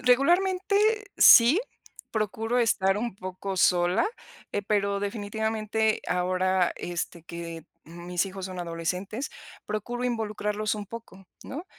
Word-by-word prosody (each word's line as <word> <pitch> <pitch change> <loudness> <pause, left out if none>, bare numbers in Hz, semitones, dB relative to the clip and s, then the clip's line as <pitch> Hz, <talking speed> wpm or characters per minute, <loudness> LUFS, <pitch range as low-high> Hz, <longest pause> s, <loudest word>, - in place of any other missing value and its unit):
regularmente, 360 +10 +3 0.4
sí, 250 - +8 0.5
procuro 225 +2 -1
estar 195 -4 +2
un 235 -1 -3
poco 190 0 -6
sola, 180 +2 +3 0.5
eh, 205 - -1
pero, 200 -1 0
definitivamente, 220 +1 -1
ahora 185 0 +1
este 175 -1 -5
que 170 -1 -7 0.2
mis 175 +2 -3
hijos 190 -1 -6
son 185 -1 -7
adolescentes, 180 - -3 0.3
procuro 240 +4 -3
involucrarlos 215 -3 -1
un 205 -1 -6
poco, 215 -4 -10 0.2
¿no? 305 +6 -6
205 Hz, 110 wpm, -27 LUFS, 185-225 Hz, 0.5 s, sí